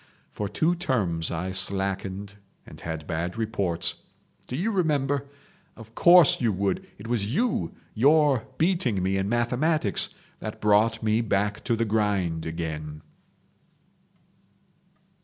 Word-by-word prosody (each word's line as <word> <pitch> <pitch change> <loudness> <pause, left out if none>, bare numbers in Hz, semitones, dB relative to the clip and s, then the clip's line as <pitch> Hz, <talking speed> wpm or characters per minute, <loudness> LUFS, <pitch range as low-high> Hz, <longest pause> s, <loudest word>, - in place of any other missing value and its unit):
For 105 -1 -4
two 160 - +1
terms 105 - 0
I 90 +3 -3
slackened 95 +1 -1 0.3
and - - -13
had 80 -2 -5
bad 85 +5 -3
reports. 100 -7 -1 0.5
Do 125 - -4
you 190 +10 0
remember? 145 -7 0 0.5
Of 110 0 -13
course 175 +1 +6
you 115 -3 +2
would! 100 0 -1
It 100 - -11
was 110 -3 -1
you—your 145 - +1
beating 155 - +1
me 95 +1 +1
in 95 +1 -1
mathematics 120 +1 0 0.3
that - - -6
brought 110 +2 +3
me 110 +1 +2
back 105 -1 -1
to 120 - +1
the 115 +1 0
grind 100 -7 0
again." 80 -2 -5
105 Hz, 120 wpm, -26 LUFS, 95-130 Hz, 0.5 s, course